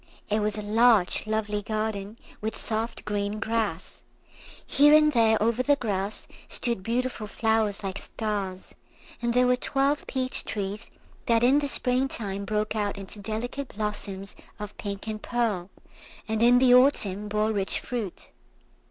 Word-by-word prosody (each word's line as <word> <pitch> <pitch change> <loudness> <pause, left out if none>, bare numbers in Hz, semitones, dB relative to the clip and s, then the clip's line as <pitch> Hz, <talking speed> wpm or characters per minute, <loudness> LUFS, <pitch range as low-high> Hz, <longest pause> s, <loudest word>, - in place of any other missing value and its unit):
It 215 - +3
was 210 0 -1
a 210 - -4
large 215 -2 +4
lovely 210 -1 -1
garden, 215 0 -3 0.2
with 220 +1 -3
soft 225 +1 -2
green 205 0 -2
grass. 220 -6 -2 0.6
Here 295 +2 +6
and 305 0 +5
there 225 -2 +4
over 230 +3 +1
the 285 +3 +3
grass 205 -5 -3 0.2
stood 235 -5 0
beautiful 235 +1 -2
flowers 220 -1 0
like 195 0 -3
stars, 200 -4 -4 0.5
and 235 0 0
there 250 0 +5
were 250 0 +4
twelve 275 +3 0
peach 260 -1 -2
trees 205 +1 -4 0.4
that 230 0 +3
in 265 +4 +5
the 290 - -1
spring 255 0 +1
time 200 -5 -4
broke 215 +1 -1
out 205 -2 -1
into 195 +1 -7
delicate 235 +6 -5
blossoms 205 -2 -4 0.2
of 210 -1 -7
pink 200 -1 -5
and 215 -1 -4
pearl, 215 -7 -1 0.6
and 220 0 -1
in 240 +1 +6
the 250 -1 +6
autumn 210 -6 +3
bore 215 +1 +1
rich 200 -3 0
fruit. 225 -7 -5
220 Hz, 150 wpm, -26 LUFS, 205-240 Hz, 0.6 s, Here